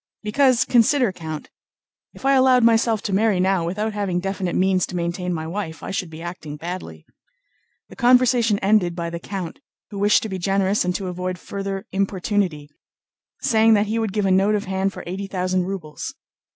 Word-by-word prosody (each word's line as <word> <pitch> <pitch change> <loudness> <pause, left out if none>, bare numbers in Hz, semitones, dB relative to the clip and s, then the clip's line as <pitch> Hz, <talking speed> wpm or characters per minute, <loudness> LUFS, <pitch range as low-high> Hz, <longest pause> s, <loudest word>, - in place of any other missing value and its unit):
"Because, 255 +3 +3
consider, 245 -1 +3
Count—if 160 - -11
I 275 - +5
allowed 260 -2 +5
myself 225 -1 +3
to 200 - -2
marry 205 -1 +2
now 190 -1 +2
without 210 +6 -2
having 195 -4 -1
definite 190 -1 -3
means 185 -1 +2
to - - -7
maintain 175 +1 -2
my 160 -2 -3
wife, 165 -1 -5
I - - -5
should 185 -2 -3
be 160 +1 -9
acting 160 -4 -7
badly...." 160 - -7 0.8
The - - -12
conversation 245 -3 +4
ended 195 -4 +3
by 170 -1 -4
the 170 - -5
count, 180 -2 -6 0.3
who 200 - -5
wished 205 +1 +4
to 220 - -4
be 190 -1 -4
generous 195 +2 +1
and 180 0 -1
to 195 - -3
avoid 180 0 -3
further 195 +1 -5
importunity, 190 -5 -1 0.7
saying 225 -3 +4
that 205 0 +2
he 220 +2 -1
would 220 -3 -1
give 205 0 0
a 190 - +2
note 195 +3 +3
of 205 - -2
hand 190 +1 -1
for - - -9
eighty 190 +3 -5
thousand 185 -1 -1
rubles. 180 -6 -6
195 Hz, 185 wpm, -22 LUFS, 180-215 Hz, 0.8 s, I